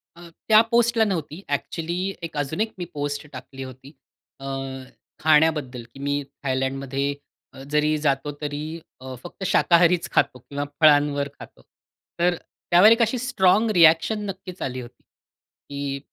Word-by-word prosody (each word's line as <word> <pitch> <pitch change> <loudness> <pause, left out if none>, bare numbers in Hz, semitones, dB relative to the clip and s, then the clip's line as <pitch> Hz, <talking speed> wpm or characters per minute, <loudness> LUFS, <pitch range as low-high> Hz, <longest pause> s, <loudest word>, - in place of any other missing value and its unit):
अ, 170 0 -13 0.2
त्या 215 0 +7
पोस्टला 235 -1 +3
नव्हती, 175 -5 -3
ॲक्चुअली 170 +6 -2
एक 160 -2 -6
अजून 145 +6 -2
एक 220 0 0
मी 180 - -4
पोस्ट 145 0 -4
टाकली 130 +1 -9
होती 130 +1 -11 0.5
अ, 135 - -9 0.7
खाण्याबद्दल, 150 -5 +2
की - - -13
मी 145 +1 -1 0.2
थायलंडमध्ये 135 +1 -1 0.4
अ, 135 - -11
जरी 150 +1 +2
जातो 145 -1 0
तरी 150 +2 -4 0.2
अ, 130 0 -7
फक्त 175 +2 -9
शाकाहारीच 170 0 +3
खातो 125 - +1
किंवा 140 +4 -5 0.2
फळांवर 145 -2 +4
खातो. - - -13 0.6
तर 175 +1 +3 0.4
त्यावर 180 +5 +8
एक 230 +1 +4
अशी 230 +2 +2
स्ट्राँग 220 -4 +2
रिएक्शन 165 +5 +5
नक्कीच 190 -1 -8
आली 130 -1 -3
होती, 120 - -13
की, 140 -1 -9
150 Hz, 140 wpm, -23 LUFS, 140-180 Hz, 0.7 s, त्यावर